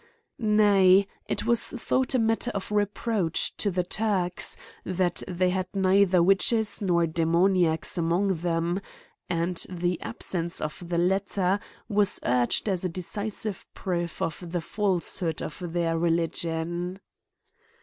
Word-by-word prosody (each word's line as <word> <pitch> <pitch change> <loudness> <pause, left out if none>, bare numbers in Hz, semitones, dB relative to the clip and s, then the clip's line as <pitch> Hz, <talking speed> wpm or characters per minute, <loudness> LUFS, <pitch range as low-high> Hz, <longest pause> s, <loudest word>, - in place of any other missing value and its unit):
Nay, 200 -3 +5 0.2
it - - -2
was 235 0 +3
thought 260 +1 0
a - - +5
matter 225 +1 +1
of 200 +1 -4
reproach 205 -3 0
to 205 - +1
the 180 -1 0
Turks, 185 -2 0 0.3
that 185 -1 0
they 180 0 +1
had 185 0 -1
neither 190 -2 +4
witch 195 +5 +4
es 220 -2 +1
nor 175 -4 +2
demoniacs 170 +1 +1
among 175 +3 +1
them; 170 +2 -1 0.5
and, 170 0 0
the 175 -1 -2
absence 170 -2 -3
of 160 +3 -6
the 170 - 0
latter, 190 +1 +1 0.3
was 205 -3 +3
urged 125 - +1
as 190 -3 0
a 185 - 0
decisive 200 +3 -4
proof 175 -2 -3
of 165 +1 -5
the 175 -1 -1
falsehood 180 -3 0
of 160 - -6
their 165 -1 -1
religion. 170 +2 -1
180 Hz, 130 wpm, -26 LUFS, 170-200 Hz, 0.5 s, Nay